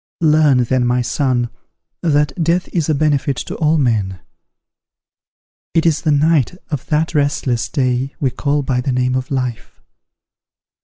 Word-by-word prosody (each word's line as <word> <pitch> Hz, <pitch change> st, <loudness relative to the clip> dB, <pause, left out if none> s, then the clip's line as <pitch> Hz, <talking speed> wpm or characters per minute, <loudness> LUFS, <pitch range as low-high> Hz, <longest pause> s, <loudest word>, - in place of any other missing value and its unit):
"Learn 150 Hz, -5 st, +4 dB
then, 125 Hz, +1 st, +1 dB
my 125 Hz, 0 st, +1 dB
son, 125 Hz, -2 st, 0 dB, 0.5 s
that 150 Hz, -4 st, +2 dB
death 170 Hz, +3 st, +1 dB
is 165 Hz, -3 st, -1 dB
a 155 Hz, -, +2 dB
benefit 140 Hz, -2 st, +1 dB
to -, -, -5 dB
all 160 Hz, 0 st, +2 dB
men: 105 Hz, -9 st, 0 dB, 1.6 s
it 165 Hz, -, +3 dB
is 155 Hz, -3 st, +2 dB
the 160 Hz, -, -1 dB
night 150 Hz, +1 st, +2 dB
of 145 Hz, -4 st, -4 dB
that 160 Hz, +2 st, 0 dB
restless 140 Hz, -5 st, 0 dB
day 130 Hz, -1 st, -1 dB
we 135 Hz, -3 st, 0 dB
call 145 Hz, +3 st, -1 dB
by 130 Hz, -2 st, 0 dB
the 135 Hz, -, -2 dB
name 125 Hz, 0 st, 0 dB
of 130 Hz, 0 st, -2 dB
life. 125 Hz, -4 st, -4 dB
140 Hz, 150 wpm, -18 LUFS, 125-155 Hz, 1.6 s, Learn